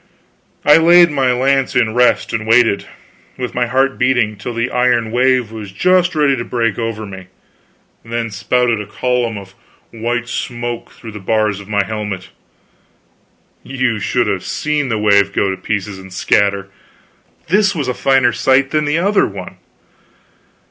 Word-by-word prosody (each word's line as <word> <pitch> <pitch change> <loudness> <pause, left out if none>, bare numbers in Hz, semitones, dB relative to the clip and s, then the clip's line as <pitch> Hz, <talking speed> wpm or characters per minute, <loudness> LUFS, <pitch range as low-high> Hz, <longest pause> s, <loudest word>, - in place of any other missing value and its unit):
I 150 +1 +7
laid 170 +1 +6
my 135 -3 +1
lance 135 +2 +1
in 115 -3 +2
rest 125 +1 +2
and 110 -1 -3
waited, 115 -3 +3 0.5
with 125 -1 -4
my 125 -1 0
heart 135 +2 0
beating, 120 -4 +1
till 110 +4 -7
the 115 +2 -2
iron 120 -2 +1
wave 125 -2 +1
was 105 -3 -8
just 180 - +2
ready 145 -3 +3
to 120 - -3
break 115 -3 -1
over 115 -2 -3
me, 95 -2 -10 0.8
then 115 -1 -4
spouted 120 +2 0
a 105 - -9
column 120 0 -1
of 95 -1 -11 0.4
white 120 +1 -3
smoke 120 -1 -5
through 115 - -11
the 105 - -8
bars 105 0 0
of 100 0 -12
my 100 -1 +1
helmet. 105 -3 -5 1.3
You 130 -4 -2
should 120 +5 0
have 95 -3 -2
seen 150 -3 -2
the 110 - 0
wave 100 -2 +3
go 100 - +1
to - - -3
pieces 100 -1 -4
and 95 0 -12
scatter! 100 +1 +1 0.8
This 200 +1 +2
was 145 -5 -2
a 125 - 0
finer 130 -2 +2
sight 130 +3 +2
than 155 -1 +1
the 145 +2 0
other 200 +4 +2
one. - - -9
120 Hz, 160 wpm, -16 LUFS, 105-130 Hz, 1.3 s, I